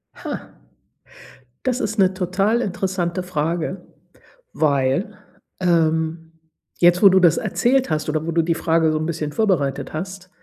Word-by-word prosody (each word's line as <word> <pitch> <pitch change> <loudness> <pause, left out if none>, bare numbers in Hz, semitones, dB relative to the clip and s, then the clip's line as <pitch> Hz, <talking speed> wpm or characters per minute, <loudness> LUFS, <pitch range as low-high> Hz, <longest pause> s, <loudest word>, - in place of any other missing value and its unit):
Ha. - - -7 1.1
Das 255 0 -1
ist 215 +1 -3
'ne 190 -1 +3
total 195 +5 0
interessante 185 -3 -2
Frage, 170 +1 -3 0.7
weil, 140 +7 0 0.4
ähm, 165 -1 0 0.5
jetzt, 175 +2 +4
wo 200 - +10
du 190 0 +4
das 170 -2 +5
erzählt 260 -4 +1
hast, 155 0 -1
oder 155 +1 -1
wo 165 - -2
du 165 0 +2
die 165 0 0
Frage 160 -1 +1
so 155 - 0
'n 155 - -3
bisschen 155 -3 -3
vorbereitet 150 -11 0
hast 185 +3 -6
175 Hz, 145 wpm, -21 LUFS, 160-190 Hz, 1.1 s, wo